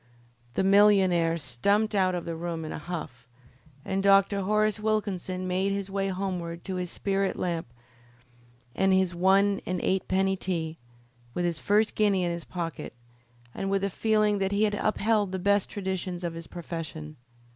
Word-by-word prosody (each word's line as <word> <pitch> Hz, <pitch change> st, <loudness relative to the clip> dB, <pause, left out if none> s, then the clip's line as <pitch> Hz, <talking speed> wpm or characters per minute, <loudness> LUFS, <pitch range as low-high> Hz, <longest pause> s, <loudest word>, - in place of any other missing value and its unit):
The -, -, +1 dB
millionaire 190 Hz, -4 st, +4 dB
stumped 200 Hz, -, +1 dB
out 185 Hz, -2 st, +2 dB
of 175 Hz, -, -4 dB
the 170 Hz, -, -4 dB
room 165 Hz, -1 st, -4 dB
in 155 Hz, -, -5 dB
a -, -, -5 dB
huff, 150 Hz, -8 st, -7 dB, 0.6 s
and 190 Hz, 0 st, -1 dB
Dr. 195 Hz, 0 st, +4 dB
Horace 215 Hz, +2 st, +1 dB
Wilkinson 195 Hz, -4 st, -2 dB
made 190 Hz, +2 st, 0 dB
his 200 Hz, -1 st, -3 dB
way 195 Hz, 0 st, -1 dB
homeward 180 Hz, -3 st, -3 dB
to 190 Hz, -1 st, -4 dB
his 180 Hz, -1 st, -3 dB
spirit 195 Hz, +1 st, -1 dB
lamp 170 Hz, -4 st, -2 dB, 1.1 s
and 195 Hz, 0 st, +3 dB
his 190 Hz, -2 st, +2 dB
one 195 Hz, +3 st, +3 dB
and 185 Hz, 0 st, -1 dB
eightpenny 190 Hz, 0 st, +1 dB
tea, 165 Hz, -3 st, -3 dB, 0.6 s
with 175 Hz, -, 0 dB
his 170 Hz, -2 st, -1 dB
first 210 Hz, +2 st, +2 dB
guinea 200 Hz, -3 st, +2 dB
in 175 Hz, -, 0 dB
his 170 Hz, 0 st, -5 dB
pocket, 165 Hz, -7 st, -5 dB, 0.6 s
and 195 Hz, -, -3 dB
with 195 Hz, 0 st, 0 dB
a 200 Hz, -, 0 dB
feeling 215 Hz, 0 st, +2 dB
that 195 Hz, 0 st, 0 dB
he 205 Hz, +1 st, +2 dB
had 210 Hz, -1 st, +2 dB
upheld 210 Hz, -1 st, +1 dB
the 190 Hz, -, -2 dB
best 200 Hz, +1 st, +2 dB
traditions 190 Hz, -2 st, -4 dB
of 170 Hz, -1 st, -2 dB
his 165 Hz, -1 st, -8 dB
profession. 160 Hz, -3 st, -7 dB
190 Hz, 165 wpm, -27 LUFS, 175-200 Hz, 1.1 s, millionaire